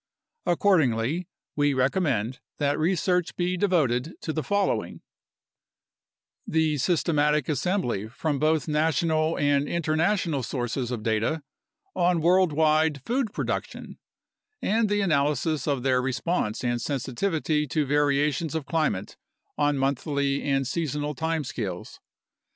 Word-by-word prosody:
Accordingly, 160 Hz, -, +2 dB, 0.3 s
we 145 Hz, -1 st, +2 dB
recommend 130 Hz, -, 0 dB, 0.2 s
that 145 Hz, 0 st, 0 dB
research 180 Hz, +1 st, +1 dB
be 180 Hz, +1 st, 0 dB
devoted 160 Hz, -7 st, +1 dB
to 155 Hz, -, -3 dB
the 155 Hz, -, -1 dB
following: 190 Hz, -, -1 dB, 1.5 s
The 155 Hz, -2 st, +1 dB
systematic 150 Hz, -2 st, +2 dB
assembly 145 Hz, -, -1 dB
from 140 Hz, +5 st, -2 dB
both 155 Hz, +1 st, +1 dB
national 155 Hz, +1 st, +1 dB
and 145 Hz, 0 st, +2 dB
international 165 Hz, -1 st, 0 dB
sources 120 Hz, 0 st, -3 dB
of 120 Hz, -4 st, -4 dB
data 115 Hz, +8 st, 0 dB, 0.5 s
on 175 Hz, -1 st, +2 dB
worldwide 160 Hz, -4 st, +3 dB
food 245 Hz, -2 st, 0 dB
production -, -, -4 dB, 0.6 s
and 220 Hz, +1 st, +1 dB
the 205 Hz, 0 st, +1 dB
analysis 150 Hz, -3 st, +1 dB
of 140 Hz, -4 st, 0 dB
their 130 Hz, -1 st, +2 dB
re 130 Hz, +1 st, -1 dB
sponse 130 Hz, -9 st, -1 dB
and 120 Hz, -1 st, 0 dB
sensitivity 150 Hz, +3 st, -1 dB
to 150 Hz, +3 st, 0 dB
variations 145 Hz, +2 st, +1 dB
of 160 Hz, -3 st, -2 dB
climate 155 Hz, -, -1 dB, 0.4 s
on 145 Hz, -1 st, +1 dB
monthly 140 Hz, +1 st, 0 dB
and 135 Hz, -1 st, 0 dB
seasonal 150 Hz, 0 st, -2 dB
time 160 Hz, +2 st, -1 dB
scales. 100 Hz, -9 st, -5 dB
150 Hz, 115 wpm, -26 LUFS, 135-165 Hz, 1.5 s, worldwide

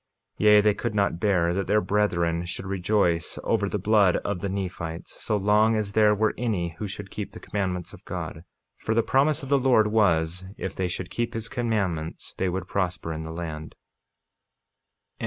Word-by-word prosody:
48:25 -, -, 0 dB
Yea, 105 Hz, 0 st, +8 dB
they 105 Hz, 0 st, +4 dB
could 110 Hz, +1 st, -3 dB
not 100 Hz, -5 st, +1 dB
bear 90 Hz, -4 st, +2 dB
that 95 Hz, +1 st, -2 dB
their 105 Hz, +2 st, +4 dB
brethren 90 Hz, -4 st, +1 dB
should 90 Hz, +2 st, -6 dB
rejoice 95 Hz, -3 st, +1 dB
over 100 Hz, -3 st, +1 dB
the 105 Hz, -, -1 dB
blood 100 Hz, -2 st, +4 dB
of 100 Hz, -3 st, -1 dB
the 100 Hz, -, -3 dB
Nephites, 90 Hz, -4 st, -5 dB
so 105 Hz, -, +1 dB
long 105 Hz, +3 st, +3 dB
as 105 Hz, -2 st, -1 dB
there 105 Hz, 0 st, +4 dB
were 110 Hz, +1 st, +1 dB
any 95 Hz, -9 st, -1 dB
who 105 Hz, -, -3 dB
should 95 Hz, 0 st, -7 dB
keep 105 Hz, -, -6 dB
the -, -, -9 dB
commandments 95 Hz, -4 st, -3 dB
of -, -, -13 dB
God, -, -, -6 dB, 0.3 s
for 110 Hz, -, -2 dB
the 115 Hz, -, +3 dB
promise 145 Hz, +5 st, +2 dB
of 135 Hz, -, -7 dB
the 140 Hz, -1 st, +4 dB
Lord 125 Hz, -4 st, +4 dB
was, 90 Hz, -5 st, +1 dB
if 95 Hz, -, -5 dB
they 95 Hz, -, -1 dB
should 90 Hz, +1 st, -5 dB
keep 120 Hz, -1 st, -2 dB
his 115 Hz, 0 st, -3 dB
commandments 100 Hz, -10 st, -2 dB
they 95 Hz, -, +1 dB
should 90 Hz, 0 st, -3 dB
prosper 90 Hz, -4 st, -2 dB
in 80 Hz, -, -5 dB
the 80 Hz, -, -6 dB
land. 80 Hz, -2 st, -6 dB
100 Hz, 195 wpm, -26 LUFS, 90-105 Hz, 0.3 s, Yea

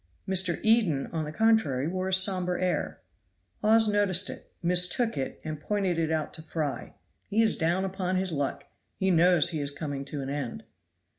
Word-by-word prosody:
Mr. 185 Hz, -2 st, +1 dB
Eden, 215 Hz, -11 st, +2 dB
on 160 Hz, -2 st, -2 dB
the 150 Hz, -, -6 dB
contrary, 160 Hz, -, +1 dB
wore 185 Hz, +2 st, -3 dB
a -, -, -2 dB
somber 185 Hz, -1 st, +3 dB
air. 180 Hz, -5 st, -2 dB, 0.6 s
Hawes 220 Hz, +1 st, +4 dB
noticed 205 Hz, -2 st, +2 dB
it, -, -, -12 dB
mistook 180 Hz, +7 st, +3 dB
it, 135 Hz, -1 st, -4 dB
and 155 Hz, -1 st, -5 dB
pointed 195 Hz, -4 st, -1 dB
it 160 Hz, -1 st, -1 dB
out 155 Hz, -2 st, -2 dB
to 160 Hz, -, -9 dB
Fry. 155 Hz, -3 st, -5 dB, 0.3 s
"He 220 Hz, +2 st, +2 dB
is 220 Hz, -, +3 dB
down 175 Hz, +4 st, 0 dB
upon 185 Hz, -1 st, -3 dB
his 185 Hz, 0 st, 0 dB
luck; 145 Hz, -3 st, -3 dB, 0.3 s
he 190 Hz, 0 st, +1 dB
knows 175 Hz, -1 st, +4 dB
he 160 Hz, -, -3 dB
is 140 Hz, -, -2 dB
coming 145 Hz, -1 st, -5 dB
to 140 Hz, 0 st, -6 dB
an 135 Hz, -, -6 dB
end." 140 Hz, -5 st, -5 dB
180 Hz, 180 wpm, -27 LUFS, 155-190 Hz, 0.6 s, Hawes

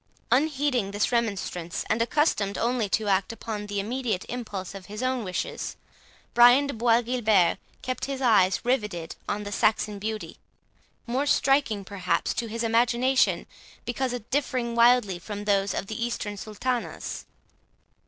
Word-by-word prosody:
Unheeding 275 Hz, -5 st, +2 dB
this 205 Hz, +4 st, 0 dB
remonstrance, 200 Hz, -6 st, -2 dB
and 220 Hz, +1 st, +1 dB
accustomed 230 Hz, -6 st, +1 dB
only 235 Hz, -3 st, 0 dB
to 215 Hz, +2 st, 0 dB
act 195 Hz, +1 st, +2 dB
upon 220 Hz, -2 st, -5 dB
the 205 Hz, 0 st, -2 dB
immediate 225 Hz, -2 st, -2 dB
impulse 210 Hz, -7 st, -5 dB
of 195 Hz, -2 st, -9 dB
his 210 Hz, +4 st, -6 dB
own 255 Hz, -2 st, 0 dB
wishes, 185 Hz, -2 st, -4 dB, 0.6 s
Brian 245 Hz, +4 st, +7 dB
de 280 Hz, -, -3 dB
Bois 230 Hz, +1 st, +3 dB
Guilbert 220 Hz, -7 st, +2 dB, 0.2 s
kept 255 Hz, 0 st, -2 dB
his 275 Hz, -1 st, -4 dB
eyes 205 Hz, -7 st, +4 dB
riveted 210 Hz, -10 st, -1 dB
on 210 Hz, 0 st, -2 dB
the 205 Hz, -, -6 dB
Saxon 210 Hz, -1 st, +1 dB
beauty, 215 Hz, +1 st, -5 dB, 0.7 s
more 260 Hz, +4 st, -1 dB
striking 270 Hz, -9 st, +2 dB
perhaps 185 Hz, -4 st, -1 dB
to 230 Hz, -, -3 dB
his 230 Hz, +1 st, -3 dB
imagination, 240 Hz, +3 st, +2 dB, 0.4 s
because 245 Hz, 0 st, -2 dB
differing 255 Hz, -4 st, 0 dB
widely 235 Hz, -6 st, +4 dB
from 205 Hz, +2 st, -6 dB
those 200 Hz, -1 st, +2 dB
of -, -, -2 dB
the 220 Hz, +3 st, -4 dB
Eastern 230 Hz, -3 st, -3 dB
sultanas. 235 Hz, +5 st, -4 dB
225 Hz, 145 wpm, -26 LUFS, 205-250 Hz, 0.7 s, Brian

